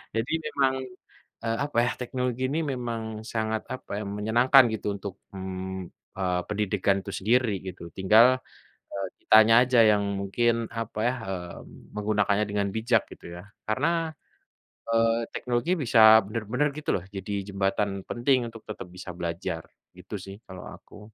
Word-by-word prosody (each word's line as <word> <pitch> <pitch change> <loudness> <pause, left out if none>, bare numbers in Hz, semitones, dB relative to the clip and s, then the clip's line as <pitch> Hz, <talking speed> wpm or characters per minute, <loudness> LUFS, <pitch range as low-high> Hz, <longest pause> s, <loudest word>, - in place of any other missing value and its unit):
Jadi 115 +6 -1
memang, 135 -3 +1 0.7
eee, 115 0 -1
apa 145 -5 -3
ya - - +1
teknologi 125 0 -2
ini 155 +3 0
memang 115 -3 -5
sangat 110 -1 -2
apa - - -11
ya - - -5
menyenangkan 120 +6 +5
gitu 105 -1 -2
untuk, 100 -1 -7 0.2
mmm, 95 -1 -5 0.3
eee, 90 -1 0
pendidikan 105 -1 +1
itu - - -7
sendiri 110 -1 +2
gitu 85 -2 -8
tinggal, 110 +5 +7 0.7
eee, 100 -1 -3 0.2
kitanya 110 +1 +7
aja 125 -1 +3
yang 105 -1 +2 0.2
mungkin 115 +3 0
apa 115 -1 -4
ya, 125 - +1 0.5
mmm, - - -16
menggunakannya 105 0 +1
dengan 100 -1 0
bijak 115 0 +2
gitu - - -17
ya? - - -10 0.2
Karena, 165 +8 0 0.8
eee, 115 0 +3
teknologi 125 +7 -1
bisa 110 -5 +7
benar-benar 115 +7 -1
gitu 150 - -5
loh 90 - -4
jadi 95 +2 -4 0.2
jembatan 100 0 -1
penting 125 0 +1
untuk 115 - -11
tetap 105 - -6
bisa 90 +1 -9
belajar, 85 -1 -3 0.3
gitu 95 +4 -8
sih 95 0 -9
kalau 95 -1 -9
aku. 105 - -16
110 Hz, 150 wpm, -27 LUFS, 100-120 Hz, 0.8 s, tinggal